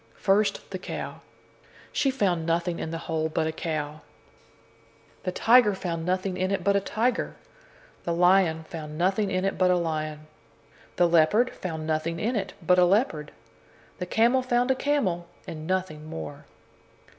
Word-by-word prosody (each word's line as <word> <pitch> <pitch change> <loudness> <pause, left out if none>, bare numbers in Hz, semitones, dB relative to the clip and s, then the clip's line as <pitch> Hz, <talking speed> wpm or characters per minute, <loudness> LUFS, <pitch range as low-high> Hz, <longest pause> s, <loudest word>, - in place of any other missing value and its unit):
First, 205 +2 +1
the - - -4
cow. - - -6 0.7
She 280 - +1
found 195 -11 +1
nothing 170 +1 0
in - - -3
the 165 - -3
hole 160 -1 -1
but 160 0 0
a 160 - 0
cow. 155 -2 -4 1.2
The 185 - 0
tiger 225 +1 +5
found 170 -3 -4
nothing 185 0 -1
in 185 0 0
it 195 -3 -1
but 200 +1 +3
a - - +5
tiger. 235 +5 -1 0.7
The 170 - -2
lion 175 -2 +4
found 155 -2 -8
nothing 190 +4 +1
in 185 0 0
it 195 - -1
but 185 -1 +4
a 180 - +4
lion. 155 -2 -3 0.7
The 175 - +4
leopard 170 +9 +4
found 160 -4 -5
nothing 160 +1 -1
in 235 +6 0
it 195 -3 -2
but 180 +1 +5
a 180 - +6
leopard. 175 - +1 0.7
The 180 - -3
camel 235 +6 +3
found 250 0 +1
a - - +2
camel, 210 -13 0 0.2
and 155 -1 -7
nothing 185 -5 -2
more. 80 - -7
180 Hz, 165 wpm, -26 LUFS, 160-200 Hz, 1.2 s, a